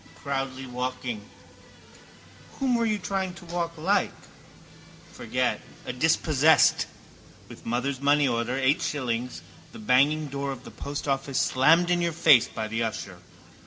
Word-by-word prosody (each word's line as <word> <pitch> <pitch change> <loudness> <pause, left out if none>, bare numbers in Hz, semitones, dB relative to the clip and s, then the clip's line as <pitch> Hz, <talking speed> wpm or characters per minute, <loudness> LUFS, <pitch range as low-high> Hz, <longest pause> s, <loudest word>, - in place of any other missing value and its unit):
Proudly 135 -2 -4
walking. 125 -4 -5 1.2
Whom 265 -2 0
were 235 -1 +2
you 215 -1 +1
trying 190 0 -3
to 175 - -12
walk 170 -1 -3
like? 190 +5 +1 1.0
Forget: - - -2 0.2
a - - -4
dispossessed. 155 +2 +3 0.6
With - - -13
mother's 125 +3 -2
money 145 0 +3
order, 120 +1 -1
eight 135 +4 +2
shillings, 125 -3 -3 0.3
the - - -9
banging 140 +7 +3
door 140 0 -4
of 130 -2 -8
the - - -11
post 145 +1 -6
office 135 -1 -1
slammed 165 +7 +4
in 175 0 +2
your 170 -1 0
face 155 -7 +5
by 110 -1 -5
the 115 +2 -3
usher. 105 -5 -4
140 Hz, 140 wpm, -26 LUFS, 125-165 Hz, 1.2 s, face